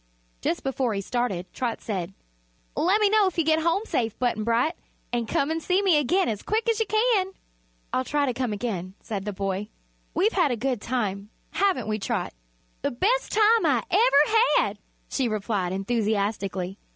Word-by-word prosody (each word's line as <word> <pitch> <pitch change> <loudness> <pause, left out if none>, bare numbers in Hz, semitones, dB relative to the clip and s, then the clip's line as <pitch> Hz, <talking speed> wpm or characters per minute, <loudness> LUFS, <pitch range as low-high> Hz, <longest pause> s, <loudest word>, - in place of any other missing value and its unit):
Just 170 - -1
before 260 -4 -1
he 200 - -1
started 200 -5 -2
Trot 245 -3 -2
said: 190 -3 -4 0.6
"Let 360 +8 +3
me 420 - +4
know 425 -2 +5
if 375 - -4
you 335 - +3
get 315 0 +3
home 335 +5 +1
safe, 225 - -1
Button 240 -3 0
Bright; 235 +8 +2 0.4
an' 235 -2 0
come 280 +7 0
an' 325 - -1
see 365 +4 +1
me 375 -5 +4
again 355 +7 +2
as 210 -3 -2
quick 440 +2 -1
as 455 -1 +2
you 450 - +1
can." 430 -4 +2 0.6
"I'll 255 - +1
try 290 +2 0
to 255 - -1
come 250 -1 -2
again," 195 -4 -4
said 200 -3 -5
the 210 - -2
boy. 195 +1 -3 0.5
"We've 410 +6 +2
had 350 -6 +3
a 245 - 0
good 245 -1 -2
time; 205 -5 -2 0.2
haven't 380 - +1
we, 215 0 -1
Trot?" 210 -3 -2 0.5
"The - - 0
bes' 440 - +1
time 440 +1 +4
I - - +2
ever 300 -11 +5 0.3
had!" - - 0 0.3
she 265 -3 0
replied, 205 -4 -1
enthusiastically. 200 -2 -1
245 Hz, 185 wpm, -25 LUFS, -, 0.6 s, know